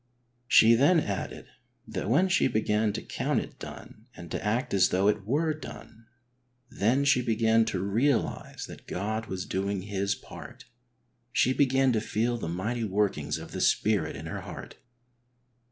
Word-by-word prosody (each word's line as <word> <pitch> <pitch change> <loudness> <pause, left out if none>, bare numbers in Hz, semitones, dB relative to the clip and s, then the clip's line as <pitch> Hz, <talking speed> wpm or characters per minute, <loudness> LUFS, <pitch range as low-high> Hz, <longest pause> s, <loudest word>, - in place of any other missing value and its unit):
She 115 -1 +7
then 145 +9 +5
added 100 -7 -4 0.4
that - - -4
when 165 +11 +4
she 185 - +3
began 110 -2 +1
to 115 - -5
count - - -1
it - - -8
done 110 +3 -11
and 85 -2 -10
to - - -3
act 120 +4 -1
as 95 -2 +4
though 95 +2 +2
it 105 -1 0
were 155 +6 +1
done, 115 -6 -11 0.6
then 125 +7 +1
she 140 -3 +4
began 115 -1 +2
to 100 -4 -2
realise 115 +7 0
that - - -12
God 110 +4 -3
was 95 -1 -4
doing 100 0 -2
His 100 0 -1
part. - - -12 0.7
She 130 0 +3
began 135 -1 +3
to 110 -3 +1
feel 115 +2 -1
the 80 - -4
mighty 110 +8 -2
workings 105 -1 0
of - - -9
the - - -4
Spirit 100 -10 +2
in 75 +3 -8
her 80 - -5
heart. - - -9
110 Hz, 165 wpm, -28 LUFS, 100-125 Hz, 0.7 s, She